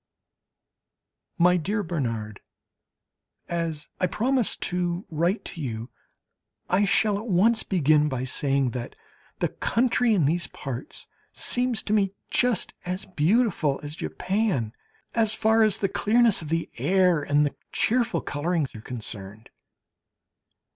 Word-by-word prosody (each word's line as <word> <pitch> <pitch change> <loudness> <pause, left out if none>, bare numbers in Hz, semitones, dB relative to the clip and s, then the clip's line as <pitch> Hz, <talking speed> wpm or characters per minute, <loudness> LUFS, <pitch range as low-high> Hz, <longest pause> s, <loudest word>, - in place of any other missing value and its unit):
MY 180 +1 +5
DEAR 205 +6 -1
BERNARD, 115 - -3 1.1
As 165 -3 -3
I 185 - +2
promised 245 +5 0
to 175 +1 -1
write 170 +7 0
to 165 - -6
you, 115 -3 -5 0.8
I 195 +3 +4
shall 200 +1 +2
at 225 - -8
once 220 +4 +3
begin 150 -4 +3
by 130 -2 -2
saying 135 0 0
that 120 0 -6 0.4
the - - 0
country 245 -1 +1
in 170 -7 +3
these 170 +4 0
parts 135 -1 -7 0.3
seems 245 -2 0
to 210 - -1
me 195 -3 +2 0.2
just 245 -6 +1
as 185 +2 -4
beautiful 180 - +1
as 145 +1 -5
Japan, 180 - -1 0.4
as 220 -2 +1
far 220 +1 +3
as 215 -3 +4
the 195 - 0
clearness 225 +1 +3
of 155 - -7
the 165 0 -1
air 180 -4 +3
and 145 +1 +2
the 145 - -3 0.2
cheerful 230 -7 +1
colouring 160 +2 -1
are 110 - -9
concerned. 110 -3 -6
175 Hz, 130 wpm, -25 LUFS, 145-210 Hz, 1.1 s, MY